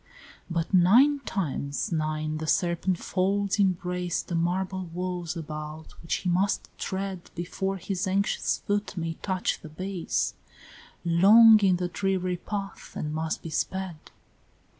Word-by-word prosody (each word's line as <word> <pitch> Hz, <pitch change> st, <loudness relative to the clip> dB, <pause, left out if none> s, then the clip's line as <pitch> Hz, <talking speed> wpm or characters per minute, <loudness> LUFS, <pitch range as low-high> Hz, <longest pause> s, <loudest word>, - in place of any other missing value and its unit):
XXVI. -, -, -21 dB
But 170 Hz, +2 st, -2 dB
nine 240 Hz, +11 st, +6 dB
times 145 Hz, -6 st, -2 dB
nine 155 Hz, -1 st, -1 dB
the 160 Hz, -, -4 dB
serpent 175 Hz, +2 st, +1 dB
folds 200 Hz, +3 st, 0 dB
embrace 180 Hz, -2 st, 0 dB
The -, -, -7 dB
marble 185 Hz, +2 st, -1 dB
walls 175 Hz, 0 st, -4 dB
about 155 Hz, 0 st, -7 dB
which 165 Hz, -, -1 dB
he 180 Hz, -, -2 dB
must 195 Hz, +3 st, 0 dB
tread 190 Hz, -2 st, -4 dB
Before 190 Hz, +3 st, -2 dB
his 190 Hz, +2 st, -3 dB
anxious 195 Hz, +2 st, +1 dB
foot 205 Hz, -1 st, -1 dB
may 165 Hz, -1 st, -2 dB
touch 185 Hz, -2 st, -1 dB
the 155 Hz, -, -9 dB
base: 185 Hz, +2 st, -2 dB, 0.7 s
Long 215 Hz, +6 st, +8 dB
in 195 Hz, -3 st, +4 dB
the 180 Hz, 0 st, -1 dB
dreary 185 Hz, -1 st, -1 dB
path, 200 Hz, +1 st, -6 dB
and 150 Hz, 0 st, -3 dB
must 160 Hz, 0 st, -2 dB
be 165 Hz, -, -6 dB
sped! 190 Hz, -1 st, -2 dB
180 Hz, 140 wpm, -27 LUFS, 165-195 Hz, 0.7 s, Long